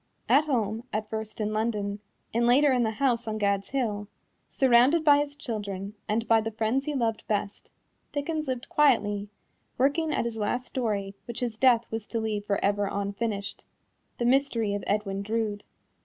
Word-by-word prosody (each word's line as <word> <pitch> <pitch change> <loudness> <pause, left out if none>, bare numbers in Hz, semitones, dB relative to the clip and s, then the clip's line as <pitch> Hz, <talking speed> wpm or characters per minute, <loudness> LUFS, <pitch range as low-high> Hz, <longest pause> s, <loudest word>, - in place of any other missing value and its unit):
At 295 +2 +5
home, 225 -5 -1
at 215 0 -3
first 220 0 -5
in 215 0 -1
London, 210 -2 -1 0.3
and 235 +1 +2
later 275 +4 +5
in 250 -1 +2
the 225 - +2
house 245 -4 +1
on 215 0 -2
Gad's 200 -1 0
Hill, 215 -6 -2 0.4
surrounded 265 +5 +4
by 290 -1 +7
his 290 0 -2
children 205 -7 -5 0.2
and 225 +2 0
by 225 -1 +5
the 225 - -2
friends 225 +5 0
he 300 - -1
loved 230 -4 0
best, 205 -1 -2 0.4
Dickens 305 +1 -2
lived 255 -2 -3
quietly, 210 -8 +2 0.5
working 295 +5 +2
at - - 0
his 230 -1 -3
last 235 +4 -1
story 205 -7 -2
which 235 +1 -6
his 240 -3 -2
death 235 -1 +4
was 225 -1 -4
to 230 - -2
leave 215 -2 -2
for 200 -1 +1
ever 200 0 +1
unfinished 200 0 -3 0.5
The 240 - -1
Mystery 245 -5 +2
of 205 - -3
Edwin 200 -2 -1
Drood. 215 -1 -2
225 Hz, 175 wpm, -27 LUFS, 205-255 Hz, 0.5 s, by